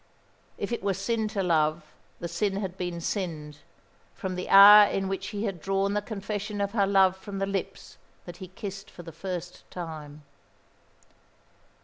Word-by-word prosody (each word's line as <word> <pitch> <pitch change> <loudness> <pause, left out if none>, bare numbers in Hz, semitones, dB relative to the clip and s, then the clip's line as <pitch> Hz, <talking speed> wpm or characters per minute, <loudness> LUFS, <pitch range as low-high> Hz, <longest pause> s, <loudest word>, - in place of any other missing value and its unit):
If - - -4
it 235 - -2
were 195 -1 0
sin 220 +3 -1
to 205 -2 -2
love, 155 -2 0 0.3
the 170 - -4
sin 195 +4 -1
had 190 -3 -4
been 175 -2 -4
sinned; 155 -6 -4 0.6
from 190 -3 -4
the 180 0 -5
hour 205 +1 +10
in 195 0 -1
which 195 0 -3
he 205 +1 -4
had 195 -6 -3
drawn 195 +2 0
the 210 - 0
confession 205 0 -5
of 200 0 -1
her 200 -3 +2
love 190 -1 +4
from 195 +1 -8
the 195 - 0
lips 195 -2 -5 0.3
that 175 -1 -9
he 185 - -8
kissed 195 +2 -8
for 175 - -12
the 165 - -9
first 180 +1 -6
time. 155 -4 -8
195 Hz, 170 wpm, -27 LUFS, 175-200 Hz, 0.6 s, hour